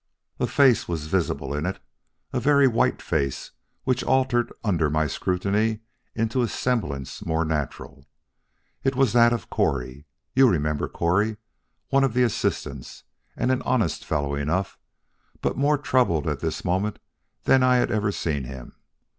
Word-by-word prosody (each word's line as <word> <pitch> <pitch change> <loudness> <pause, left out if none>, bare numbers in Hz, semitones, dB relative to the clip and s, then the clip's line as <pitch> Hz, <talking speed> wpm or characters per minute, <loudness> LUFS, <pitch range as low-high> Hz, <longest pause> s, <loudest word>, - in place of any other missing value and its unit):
A - - +1
face 135 -5 +4
was 80 -3 -3
visible 80 -5 -1
in 75 +4 -2
it 95 - -3 0.5
a 125 - +1
very 140 +1 +4
white 115 - +1
face 70 -4 -2 0.3
which 130 -1 0
altered 130 -2 +1
under 85 -8 +1
my 75 +1 +1
scrutiny 100 +8 0 0.3
into 115 +3 0
a 120 - +1
semblance 85 - -2
more 80 0 0
natural. 70 -2 -4 0.8
It 135 0 +1
was 130 -4 +2
that 120 -1 +6
of 120 - -3
Correy 65 +2 -1 0.3
you 135 -1 +6
remember 75 -4 0
Correy, 105 +6 0 0.5
one 135 0 +3
of 130 -4 0
the 125 - +4
assistants, 70 - -2 0.3
and 130 - +1
an 130 - +1
honest 120 -9 0
fellow 70 -2 -1
enough, 80 +7 -1 0.6
but - - -1
more 145 +2 +2
troubled 125 - +1
at 75 -3 -1
this - - -3
moment 95 +4 0 0.5
than 135 - +4
I 130 0 +4
had 125 - +2
ever 105 -2 +1
seen 75 -8 -2
him. 65 0 -9
100 Hz, 155 wpm, -24 LUFS, 75-125 Hz, 0.8 s, that